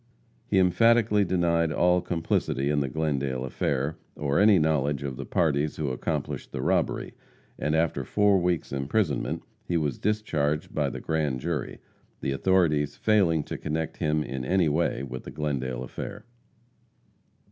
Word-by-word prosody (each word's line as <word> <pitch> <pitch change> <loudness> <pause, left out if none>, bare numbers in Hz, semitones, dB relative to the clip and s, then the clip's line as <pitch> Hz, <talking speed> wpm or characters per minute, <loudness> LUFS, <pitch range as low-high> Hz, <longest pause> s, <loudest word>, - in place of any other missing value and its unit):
He - - +1
emphatically 105 +3 +4
denied 85 -3 +1
all 90 +2 +3
complicity 80 -5 -1
in 75 - +2
the 70 -2 -1
Glendale 70 -4 -1
affair, 70 +3 -1 0.2
or 70 -1 0
any 105 -1 +6
knowledge 75 -3 +1
of 70 -2 -4
the - - -7
parties 75 -3 +1
who 75 -3 -2
accomplished 65 - -3
the - - -4
robbery, - - 0 0.5
and 75 +1 0
after 80 0 +1
four 105 -2 +3
weeks' 90 -2 -1
imprisonment 70 +4 -1 0.2
he 85 - -1
was 75 -5 -1
discharged 75 -9 -1
by - - 0
the - - -7
Grand 75 -5 -1
Jury, 75 -2 -3 0.4
the - - -2
authorities 75 -2 +2
failing 95 -8 +2
to - - -6
connect 80 +1 -3
him, 75 -1 +1
in 65 -3 -5
any 90 +4 +2
way, 80 -2 0
with 65 -1 -6
the - - -8
Glendale 65 -4 -2
affair. 100 - -7
80 Hz, 150 wpm, -27 LUFS, 70-90 Hz, 0.5 s, any